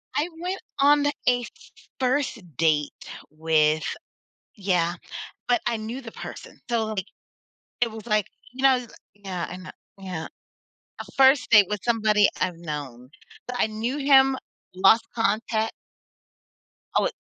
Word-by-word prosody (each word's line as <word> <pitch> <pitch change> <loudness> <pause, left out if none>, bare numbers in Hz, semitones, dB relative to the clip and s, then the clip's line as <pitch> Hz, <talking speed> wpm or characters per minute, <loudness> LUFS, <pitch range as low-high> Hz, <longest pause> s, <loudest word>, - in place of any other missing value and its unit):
I 305 +4 +1
went 365 +2 -3 0.2
on 290 +1 +5
a - - +4 0.2
f 245 -1 +3
f - - -20
first 260 -1 0 0.2
date 150 -3 +2 0.4
with 155 0 +2 0.7
Yeah, 180 -4 +1 0.5
but 245 - +3
I 235 - +1
knew 225 +4 -5
the 225 -2 -9
person. - - -9
So, 230 -2 +1
like, 205 -3 -3 0.7
it 235 -2 +2
was, 220 0 -10
like, 215 -3 +2 0.3
you 260 +1 -7
know 255 -2 +4 0.3
Yeah 190 -4 -5
I 180 - -6
kno 185 0 -9 0.3
Yeah. 180 -5 -5 0.7
A - - -4
first 270 0 +5
date 210 -3 +8
with 210 -1 -2
somebody 215 -3 +4
I've 180 -2 0
known, 140 -6 -7 0.4
but 250 - -4
I - - +4
knew 220 +5 -3
him, 270 -1 +5 0.4
lost 210 +5 +5
contact 225 0 0 1.2
Oh, - - +4
it - - -1
220 Hz, 140 wpm, -25 LUFS, 180-250 Hz, 1.2 s, date